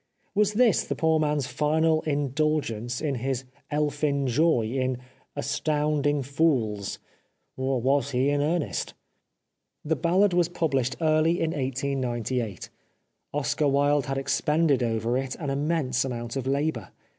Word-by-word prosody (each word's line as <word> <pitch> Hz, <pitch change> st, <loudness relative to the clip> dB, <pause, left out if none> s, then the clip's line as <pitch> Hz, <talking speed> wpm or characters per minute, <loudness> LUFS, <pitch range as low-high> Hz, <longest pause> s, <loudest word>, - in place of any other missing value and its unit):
Was 210 Hz, 0 st, +2 dB
this 230 Hz, -2 st, +4 dB
the -, -, -3 dB
poor 160 Hz, -1 st, +2 dB
man's 150 Hz, -3 st, +1 dB
final 155 Hz, +3 st, +1 dB
indulgence 140 Hz, -5 st, -1 dB
in 150 Hz, -3 st, 0 dB
his 130 Hz, 0 st, -1 dB, 0.3 s
elfin 145 Hz, -1 st, 0 dB
joy 130 Hz, 0 st, +3 dB
in 130 Hz, +2 st, -1 dB, 0.2 s
" -, -, -37 dB
astounding 145 Hz, -1 st, 0 dB
fools/' 125 Hz, -8 st, 0 dB, 0.6 s
or 130 Hz, 0 st, 0 dB
was 135 Hz, +2 st, +1 dB
he 130 Hz, +1 st, +1 dB
in 145 Hz, 0 st, +1 dB
earnest? 150 Hz, -, -1 dB, 0.9 s
The 160 Hz, +2 st, +1 dB
Ballad 180 Hz, +5 st, +2 dB
was 175 Hz, -1 st, +2 dB
published 135 Hz, -7 st, 0 dB
early 160 Hz, +2 st, +3 dB
in 160 Hz, -, 0 dB
1898. 130 Hz, -, -2 dB, 0.6 s
Oscar 145 Hz, +1 st, 0 dB
Wilde 140 Hz, 0 st, +2 dB
had 135 Hz, 0 st, -2 dB
expended 145 Hz, +1 st, +1 dB
over 115 Hz, +1 st, 0 dB
it 135 Hz, -1 st, -4 dB
an 145 Hz, -4 st, -4 dB
immense 140 Hz, -3 st, 0 dB
amount 120 Hz, -2 st, -4 dB
of 135 Hz, -1 st, -3 dB
labour. 145 Hz, +4 st, -1 dB
140 Hz, 135 wpm, -26 LUFS, 130-155 Hz, 0.9 s, this